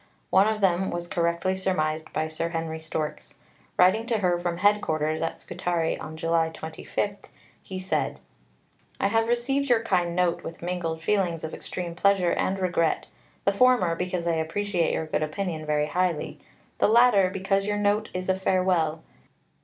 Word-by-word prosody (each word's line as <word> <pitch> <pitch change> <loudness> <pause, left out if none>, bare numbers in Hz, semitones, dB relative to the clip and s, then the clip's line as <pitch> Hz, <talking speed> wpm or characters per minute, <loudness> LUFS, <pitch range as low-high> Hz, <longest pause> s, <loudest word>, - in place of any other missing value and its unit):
One 195 +2 +5
of 215 -1 -1
them 190 0 +2
was 175 0 -4
correctly 170 +2 0
surmised 160 -4 -1
by 155 0 -1
Sir 160 +1 -3
Henry 165 -1 -3
Storks. 155 -1 -5 0.4
Writing 205 +6 +4
to 230 -2 +1
her 180 -4 +1
from 175 -1 -2
Headquarters 160 -6 +1
at 165 - -3
Scutari, 170 -2 -1
on 160 0 -8
July 165 0 +1
25, 160 +5 -4 0.4
he 190 - -7
said: 185 +1 -1 0.8
I 200 - +2
have 225 +1 +2
received 260 +4 0
your 230 -2 +4
kind 175 -5 +1
note 180 -1 +1
with 165 - -8
mingled 170 -2 -3
feelings 180 -5 0
of 160 - -5
extreme 175 -2 -5
pleasure 185 0 +3
and 190 - 0
regret 175 -4 0 0.4
the 200 - +3
former, 245 -6 +4
because 180 -1 -2
I 170 - +2
appreciate 170 +2 0
your 160 - -1
good 155 - -1
opinion 155 0 -3
very 150 0 +2
highly; 180 0 -1 0.4
the - - +4
latter, 220 -4 +5
because 195 +1 0
your 205 0 0
note 205 +1 +1
is 185 0 -4
a 190 - +3
Farewell. 185 -4 +1
180 Hz, 165 wpm, -26 LUFS, 165-200 Hz, 0.8 s, One